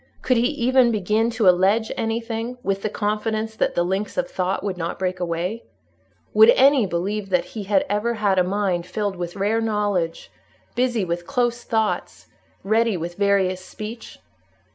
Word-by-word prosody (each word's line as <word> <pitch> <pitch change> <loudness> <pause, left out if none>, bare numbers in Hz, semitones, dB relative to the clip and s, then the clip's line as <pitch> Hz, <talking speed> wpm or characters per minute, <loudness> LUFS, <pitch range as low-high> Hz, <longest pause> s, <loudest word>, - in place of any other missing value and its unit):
Could 255 - +2
he 235 +1 +3
even 260 -3 +3
begin 215 +2 +1
to 225 -3 +1
allege 195 +5 +3
anything, 230 +2 -3
with 195 0 -1
the 215 - -1
confidence 215 +1 -2
that - - 0
the 175 - +2
links 190 +4 -2
of 270 -1 0
thought 185 -7 -2
would 200 -2 -2
not 170 -1 -4
break 185 -1 -2
away? 175 +5 -2 0.7
Would 440 - +7
any 270 - +5
believe 195 +4 -2
that 180 -2 +1
he 210 -3 -5
had 215 +9 +2
ever 230 +1 0
had 200 -3 +2
a - - +4
mind 185 -2 -1
filled 205 +1 -2
with 175 -1 -5
rare 210 +3 0
knowledge, 205 -6 -1 0.4
busy 245 -5 0
with 175 0 -4
close 240 -2 0
thoughts, 220 -3 -2 0.4
ready 220 0 +2
with 170 +1 -5
various 190 -1 +1
speech? 215 +4 -8
210 Hz, 165 wpm, -22 LUFS, 185-230 Hz, 0.7 s, Would